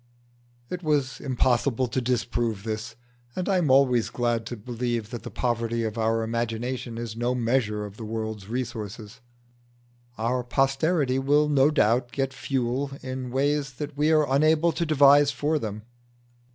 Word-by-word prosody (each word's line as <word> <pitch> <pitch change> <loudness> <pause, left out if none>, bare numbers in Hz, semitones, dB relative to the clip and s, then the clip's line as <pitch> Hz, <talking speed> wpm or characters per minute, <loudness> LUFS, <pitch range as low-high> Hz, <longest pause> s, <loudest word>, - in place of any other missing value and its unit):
It 180 - -4
was 145 -5 0
impossible 130 -1 +1
to 130 +2 -1
disprove 120 -3 -1
this, 110 +1 -4 0.4
and 185 - -3
I 195 -2 +3
am 160 -5 +1
always 130 -3 +4
glad 120 -2 -1
to 120 - -5
believe 120 0 -3
that 120 - -5
the - - -7
poverty 115 -1 -1
of 110 -1 -3
our 115 0 +1
imagination 115 +1 -3
is 115 -2 -5
no 120 +2 0
measure 115 -3 0
of 100 0 -10
the 115 - -7
world's 110 -2 -4
resources. 110 -3 -5 1.0
Our 120 +3 0
posterity 135 +2 +1
will 145 +3 +3
no 140 -1 +4
doubt 120 -4 +2
get 135 -1 -2
fuel 135 0 -1
in 130 -1 -5
ways 140 +1 0
that 145 +2 -6
we 150 +2 +2
are 155 -1 +4
unable 155 +4 +3
to 170 0 -2
devise 145 -1 +6
for 145 +4 0
them. 105 -3 -5
125 Hz, 155 wpm, -26 LUFS, 115-140 Hz, 1.0 s, devise